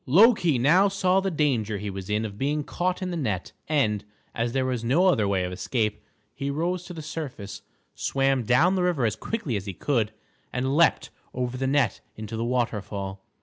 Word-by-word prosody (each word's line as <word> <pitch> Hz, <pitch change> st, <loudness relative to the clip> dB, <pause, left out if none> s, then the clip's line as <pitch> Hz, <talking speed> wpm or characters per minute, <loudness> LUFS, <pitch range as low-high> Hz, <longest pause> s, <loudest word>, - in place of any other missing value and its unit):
Loki 175 Hz, -, +5 dB
now 165 Hz, +11 st, +5 dB
saw 190 Hz, -1 st, +2 dB
the 195 Hz, 0 st, 0 dB
danger 130 Hz, -, 0 dB
he 100 Hz, 0 st, -4 dB
was 95 Hz, 0 st, -7 dB
in 105 Hz, +1 st, 0 dB
of 100 Hz, -1 st, -7 dB
being 145 Hz, +2 st, 0 dB
caught 180 Hz, +5 st, -2 dB
in 180 Hz, -, -2 dB
the -, -, -2 dB
net, 105 Hz, -, -2 dB, 0.2 s
and, 110 Hz, -9 st, +1 dB, 0.3 s
as 115 Hz, 0 st, -1 dB
there 130 Hz, +1 st, 0 dB
was 125 Hz, -3 st, -1 dB
no 140 Hz, +11 st, +3 dB
other 110 Hz, -, +3 dB
way 95 Hz, -2 st, +1 dB
of 90 Hz, -, -3 dB
escape, 105 Hz, +2 st, -1 dB, 0.3 s
he 140 Hz, -, -3 dB
rose 175 Hz, +5 st, -1 dB
to 180 Hz, -, -8 dB
the 160 Hz, -, -7 dB
surface, 145 Hz, -10 st, -6 dB, 0.3 s
swam 135 Hz, -1 st, +1 dB
down 125 Hz, -, +4 dB
the 190 Hz, -, +1 dB
river 175 Hz, -8 st, +1 dB
as 110 Hz, -1 st, +1 dB
quickly 145 Hz, -, -3 dB
as 100 Hz, 0 st, -4 dB
he 95 Hz, -, -3 dB
could, 115 Hz, -, 0 dB, 0.4 s
and 130 Hz, +2 st, -1 dB
leaped 170 Hz, +1 st, +3 dB, 0.2 s
over 125 Hz, 0 st, -2 dB
the 130 Hz, +1 st, -1 dB
net 135 Hz, -6 st, +1 dB
into 110 Hz, +1 st, -6 dB
the 115 Hz, -, -2 dB
waterfall. 105 Hz, -5 st, -2 dB
130 Hz, 200 wpm, -26 LUFS, 110-160 Hz, 0.4 s, Loki